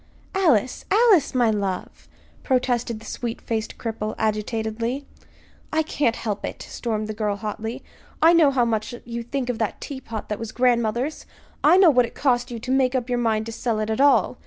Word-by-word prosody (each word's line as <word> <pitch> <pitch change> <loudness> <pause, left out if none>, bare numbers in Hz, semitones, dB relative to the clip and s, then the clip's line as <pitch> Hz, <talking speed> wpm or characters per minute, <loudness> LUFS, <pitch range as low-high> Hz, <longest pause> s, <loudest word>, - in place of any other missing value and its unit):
"Alice, 290 - +2
Alice, 405 - +4
my 240 -3 +4
love!" 195 -3 -3 0.3
protested 245 -3 0
the 220 - -14
sweet 235 -2 -4
faced 220 -1 -3
cripple, 220 -2 -4
agitatedly. 220 +4 -2 0.7
"I 315 0 +2
can't 285 -6 0
help 210 -3 -4
it," - - -5
stormed 215 -3 -3
the 215 - -4
girl, 210 -1 -1
hotly. 220 +3 -5 0.4
"I 330 +2 +6
know 330 -4 +6
how 260 -3 +2
much 225 +1 -2
you 235 0 -4
think 250 +2 -3
of 245 -3 -2
that 220 -3 -2
teapot 240 -6 -6
that 210 - -3
was 225 -1 -5
grandmother's. 245 +3 +1 0.4
I 360 - +7
know 375 -4 +7
what 250 -3 +3
it - - -15
cost 245 -3 +1
you 240 - -5
to 245 +3 -5
make 265 -1 +2
up 250 -1 -1
your 245 -1 +1
mind 220 -2 +1
to 230 - -5
sell 225 0 -2
it 215 +1 -1
at 220 - 0
all. 285 0 +4
235 Hz, 190 wpm, -23 LUFS, 220-260 Hz, 0.7 s, I